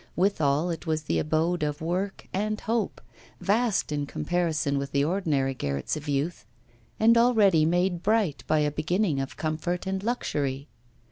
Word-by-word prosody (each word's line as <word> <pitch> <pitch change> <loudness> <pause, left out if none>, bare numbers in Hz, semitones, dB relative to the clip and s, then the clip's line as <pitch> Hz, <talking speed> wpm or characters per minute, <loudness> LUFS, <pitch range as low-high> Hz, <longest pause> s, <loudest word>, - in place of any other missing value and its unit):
Withal, 170 -4 +2
it 165 +1 -6
was 155 -1 0
the - - 0
abode 160 +3 0
of 150 0 -1
work 180 +4 -3
and 215 +2 -1
hope, 225 0 -2 0.4
vast 215 -3 +1
in 145 -1 -2
comparison 160 -4 0
with 140 0 -5
the 140 0 +3
ordinary 150 -6 0
garrets 70 - -2
of 150 -1 -6
youth, 140 -3 -1 0.6
and 230 +1 +6
already 205 -10 +4
made 175 +1 +1
bright 205 -8 +1
by 155 -1 +3
a 150 0 +1
beginning 160 +1 0
of 135 - -6
comfort 165 +3 -2
and 190 0 -2
luxury. 145 - -2
165 Hz, 155 wpm, -27 LUFS, 145-195 Hz, 0.6 s, and